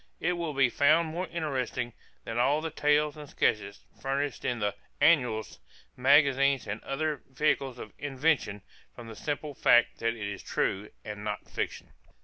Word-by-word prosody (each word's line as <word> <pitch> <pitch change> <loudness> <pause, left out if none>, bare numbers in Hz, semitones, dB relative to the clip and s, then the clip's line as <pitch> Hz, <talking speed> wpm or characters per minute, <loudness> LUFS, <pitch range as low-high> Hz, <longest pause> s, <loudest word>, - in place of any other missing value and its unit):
It 175 +2 +1
will 170 -4 -3
be 135 -2 +5
found 155 +3 +4
more 175 +3 -3
interesting 130 -7 -2 0.3
than 115 +1 -3
all 140 +5 +3
the 160 0 -4
tales 150 0 +2
and 150 -2 -10
sketches 105 -1 0 0.2
furnished 135 0 -2
in 120 - 0
the 105 -2 0 0.3
'Annuals,' 125 -9 +3 0.4
magazines, 140 0 +4
and 105 +1 -5
other 150 0 -2
vehicles 135 -1 0
of 105 - -9
invention, 140 -7 0 0.3
from 120 - -9
the 110 - -8
simple 145 +2 -4
fact 120 -2 +4
that 115 0 0
it 105 -3 -4
is 100 -1 -5
truth 100 +2 -1
and 105 -1 -6
not 105 -1 -4
fiction." - - -4
135 Hz, 160 wpm, -29 LUFS, 115-150 Hz, 0.4 s, be